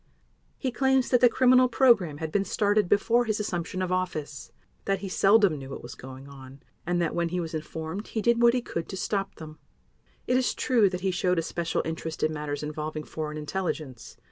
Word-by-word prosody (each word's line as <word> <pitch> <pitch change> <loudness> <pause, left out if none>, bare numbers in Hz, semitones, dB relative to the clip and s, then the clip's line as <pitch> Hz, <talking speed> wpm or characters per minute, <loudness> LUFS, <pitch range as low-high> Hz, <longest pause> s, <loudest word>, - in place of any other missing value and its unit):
He 260 - -2
claims 265 0 +2
that 245 - +3
the 245 - +7
criminal 255 +1 +5
program 225 - +3
had 160 0 -5
been 200 +2 +1
started 205 -1 +1
before 230 +4 +3
his 215 -2 -1
assumption 185 -2 -3
of 185 - -3
office; 155 -7 -3 0.3
that 195 -1 0
he 200 - -4
seldom 195 -3 +4
knew 135 0 -9
what 135 - -7
was 120 - -8
going 130 +1 -11
on; 135 -1 -13 0.2
and 175 0 +1
that 170 -2 0
when 170 -1 0
he 180 +1 -2
was 165 -2 -4
informed 160 +5 -5
he 220 - -3
did 235 0 +3
what 235 +1 +5
he 250 - -1
could 165 - -5
to 190 - -5
stop 195 0 -2
them. 155 -1 -11 0.7
It 250 - +2
is 255 - 0
true 230 -6 +3
that 180 -1 -5
he 190 0 0
showed 180 0 0
a 165 - +1
special 170 0 -2
interest 160 0 -4
in 155 0 +1
matters 150 -1 -4
involving 155 0 -4
foreign 155 -1 -5
intelligence. 150 -6 -5
180 Hz, 210 wpm, -27 LUFS, 155-215 Hz, 0.7 s, the